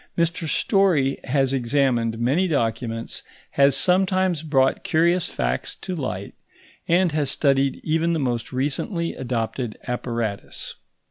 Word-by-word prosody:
Mr 170 0 0
Story 165 -7 +2
has 135 0 +1
examined 120 -3 +1
many 140 +11 +1
documents, 115 -5 -2 0.3
has 140 0 +4
sometimes 185 -2 +2
brought 135 -4 +1
curious 170 +2 +2
facts - - -2
to 185 - -5
light, 115 - -4 0.5
and 175 0 +3
has 150 -3 0
studied 135 -1 +1
even 165 +2 +1
the - - +1
most 120 -4 -2
recently 150 - -1
adopted 120 -2 -3
apparatus. 115 -4 -3
140 Hz, 120 wpm, -23 LUFS, 120-170 Hz, 0.5 s, has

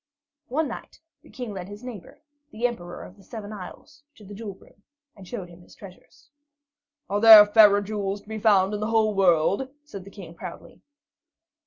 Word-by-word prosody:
One 300 +4 -1
night 235 - -10 0.2
the - - -20
King 245 -5 -7
led 185 -2 -7
his 205 +3 -11
neighbor, 250 +5 -11 0.3
the 235 -3 -4
Emperor 175 -8 -4
of 185 - -14
the 195 - -19
Seven 215 +1 -9
Isles, 280 +9 -11
to 210 - -16
the 205 - -11
jewel 205 -2 -8
room, 200 - -23 0.3
and 195 -3 -14
showed 200 -5 -6
him 175 0 -16
his - - -19
treasures. 215 +9 -16 0.8
"Are 205 +1 -2
there 220 -2 +10
fairer 205 -1 +5
jewels 205 -1 -4
to - - -30
be 220 0 -6
found 200 -2 +3
in 210 - -3
the 215 - -2
whole 220 -1 +2
wide - - -9
world?" 185 +9 +2
said 200 -11 -10
the 195 - -13
King 190 -5 -12
proudly. 170 +1 -11
205 Hz, 195 wpm, -24 LUFS, 195-225 Hz, 0.8 s, there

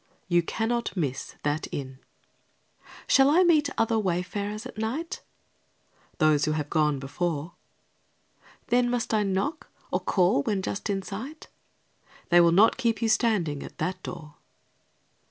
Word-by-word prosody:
You 175 -1 +3
cannot 225 +5 -2
miss 140 -7 -3
that 150 +2 -1
inn. 130 -2 -6 1.1
Shall 270 0 +5
I 340 +5 +5
meet 310 -5 +4
other 225 0 +2
wayfarers 200 +3 -2
at - - -8
night? 265 +10 -3 1.0
Those 155 -2 +3
who 155 - 0
have 150 -1 -3
gone 150 -3 +2
before. 150 +4 -3 1.2
Then 245 0 +3
must 240 -2 -1
I 215 - +3
knock, 200 +10 -2 0.2
or - - +1
call 180 -6 +2
when 190 +5 -1
just 200 - -3
in 195 -1 -1
sight? 255 - -8 0.8
They 175 0 +7
will 170 -1 +5
not 200 +6 +5
keep 230 -4 0
you 225 - 0
standing 200 - +1
at - - -10
that 185 0 -3
door. 155 -4 -9
195 Hz, 140 wpm, -27 LUFS, 160-230 Hz, 1.2 s, They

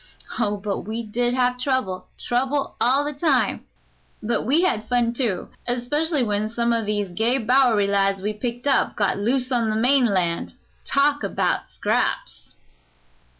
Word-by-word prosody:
Oh, 205 0 0
but 200 0 -3
we 225 +2 -3
did 240 +3 -1
have 250 -1 +1
trouble 255 -9 -1
trouble 270 +3 -1
all 265 +4 +3
the 295 - -3
time, 285 -2 +1 0.6
but 225 0 -1
we 305 +7 +3
had 220 -12 0
fun, 240 -1 +1
too, 235 -8 -2 0.2
especially 285 +5 0
when 210 -1 -1
some 235 +1 0
o' 230 -1 0
these 205 -2 -1
gay 225 +8 +1
Bowery 240 -3 +3
lads 195 -1 +1
we'd 210 +2 -4
picked 245 0 -4
up 280 - +2
got 205 -1 0
loose 250 +5 0
on 235 -3 +1
the 215 - 0
mainland. 220 -8 +2 0.3
Talk 285 +1 +2
about 200 - -1
scraps!" - - -2
240 Hz, 150 wpm, -23 LUFS, 210-260 Hz, 0.6 s, all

